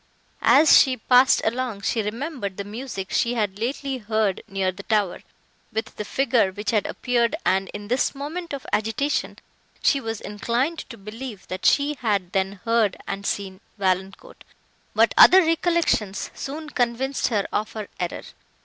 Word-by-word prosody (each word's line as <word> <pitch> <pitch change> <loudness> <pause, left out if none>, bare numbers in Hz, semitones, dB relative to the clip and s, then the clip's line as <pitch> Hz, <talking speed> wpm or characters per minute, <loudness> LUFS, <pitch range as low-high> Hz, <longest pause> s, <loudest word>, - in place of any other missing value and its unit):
As 310 +3 +7
she 260 -2 +1
passed 250 +3 +4
along, 235 -2 -2
she 220 +3 0
remembered 220 - -4
the 200 - -3
music 210 -2 -6
she 235 +1 +1
had 205 -3 -1
lately 265 +3 -2
heard 215 -3 0
near 190 -1 -1
the 190 +2 -10
tower, 205 -3 0 0.5
with 220 0 -4
the 210 - -4
figure, 240 -3 +1
which 205 +2 -3
had 215 -3 +1
appeared, 240 0 0
and, 190 0 +1
in 205 0 -7
this 250 +5 0
moment 320 +5 -5
of 280 -2 -5
agitation, 225 +7 -1 0.5
she 275 - +3
was 225 -3 -4
inclined 240 +10 -2
to 230 - -9
believe, 215 0 -8
that 185 +1 -1
she 285 +1 +3
had 200 -6 0
then 195 0 -1
heard 230 -4 +2
and 200 0 -4
seen 190 -2 -3 0.2
Valancourt; 190 - -2 0.5
but - - +4
other 375 0 +9
recollections 325 - 0
soon 300 +2 -6
convinced 250 +3 0
her 210 -5 0
of 215 +1 -1
her 215 -2 -5
error. 175 -1 -3
225 Hz, 160 wpm, -24 LUFS, 200-265 Hz, 0.5 s, other